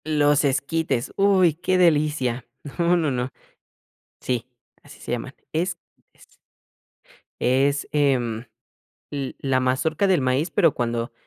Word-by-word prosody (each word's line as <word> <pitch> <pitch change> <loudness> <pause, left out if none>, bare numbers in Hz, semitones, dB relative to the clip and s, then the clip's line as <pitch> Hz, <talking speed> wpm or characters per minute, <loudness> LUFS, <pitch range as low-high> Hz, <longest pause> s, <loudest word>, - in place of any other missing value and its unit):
Los 150 -1 +3
esquites, 140 -1 -1
uy, 190 -4 +4
qué 180 +3 0
delicia, 150 -8 +2 0.3
no, 170 +1 +3
no, 155 -4 0
no. 125 0 -2 0.9
Sí, 125 -1 -2 0.3
así - - -15
se - - -7
llaman, 120 +3 -4 0.2
esquites, 170 +2 -6 1.0
es, 140 +3 +1
em, 125 -6 +1 0.7
l 140 -2 -4
la 130 -2 +1
mazorca 130 +8 +1
del 185 -2 +3
maíz, 130 +5 0
pero 165 -8 +3
cuando, 120 -1 -2
140 Hz, 115 wpm, -23 LUFS, 130-165 Hz, 1.0 s, uy